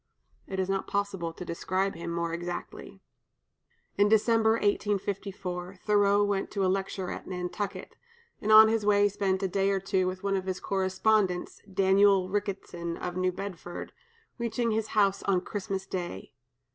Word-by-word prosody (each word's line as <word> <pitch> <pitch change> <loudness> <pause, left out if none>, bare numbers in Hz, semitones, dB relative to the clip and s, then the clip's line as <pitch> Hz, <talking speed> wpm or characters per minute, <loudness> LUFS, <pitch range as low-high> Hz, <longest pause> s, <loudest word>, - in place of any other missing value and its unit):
It 190 - -4
is 190 - 0
not 195 0 -1
possible 200 -4 -2
to 180 - -9
describe 185 +3 -1
him 170 0 -6
more 170 0 -2
exactly. 175 +1 -6 1.0
In 205 0 +5
December, 220 +1 +4
1854, 200 -3 -2
Thoreau 205 -1 +4
went 200 -1 -1
to 195 -2 0
lecture 190 0 -2
at - - -7
Nantucket, 185 +2 -4 0.5
and 215 - 0
on 220 0 +10
his 220 -1 +1
way 205 0 +4
spent 195 -1 -1
a - - +2
day 195 +1 +1
or 195 -1 +1
two 190 -1 0
with 185 +1 -4
one 200 0 +1
of 190 -1 -2
his 185 -1 -2
correspondents, 190 0 0
Daniel 195 0 +4
Ricketson 185 -4 -3
of 180 0 -5
New 185 0 +1
Bedford, 180 -2 -7 0.5
reaching 235 0 -1
his 220 0 0
house 200 -1 +3
on 190 -2 +2
Christmas 195 -1 -4
day. 180 -2 -5
195 Hz, 155 wpm, -28 LUFS, 185-205 Hz, 1.0 s, on